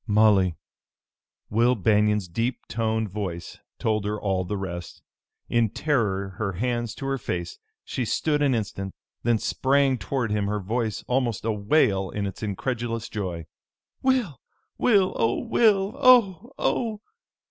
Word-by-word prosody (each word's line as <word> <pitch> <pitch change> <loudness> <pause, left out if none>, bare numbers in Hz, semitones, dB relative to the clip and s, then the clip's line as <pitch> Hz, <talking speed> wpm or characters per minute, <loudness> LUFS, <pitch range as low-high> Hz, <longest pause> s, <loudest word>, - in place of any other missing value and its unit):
"Molly!" 105 -5 +4 1.0
Will 120 +4 +3
Banion's 105 -1 +2
deep 115 +8 -2
toned 110 -1 -1
voice 90 -5 -5 0.2
told 110 -2 0
her 105 +1 -2
all 95 -2 0
the 100 +3 -3
rest. 90 -3 -6 0.4
In 115 -2 +2
terror, 105 -9 0
her 100 -3 -1
hands 120 +3 -2
to 135 - -6
her 135 0 -1
face, 85 -5 -4 0.3
she 130 - -2
stood 150 +6 0
an 140 -3 +3
instant, 100 -3 -4 0.3
then 120 -1 +2
sprang 135 +3 +2
toward 125 -4 -2
him, 105 -1 0
her 105 +1 -1
voice 110 +2 -2
almost 120 -4 0
a 115 - +2
wail 100 -3 +2
in 105 +2 -3
its 95 - -6
incredulous 115 +2 -3
joy. 90 -6 -4 0.6
"Will! 250 - +1 0.4
Will! 200 -6 +4
Oh, 115 +1 +2
Will! 215 -4 +3
Oh! 240 -5 +5
Oh!" 220 -4 -1
110 Hz, 140 wpm, -25 LUFS, 100-130 Hz, 1.0 s, Oh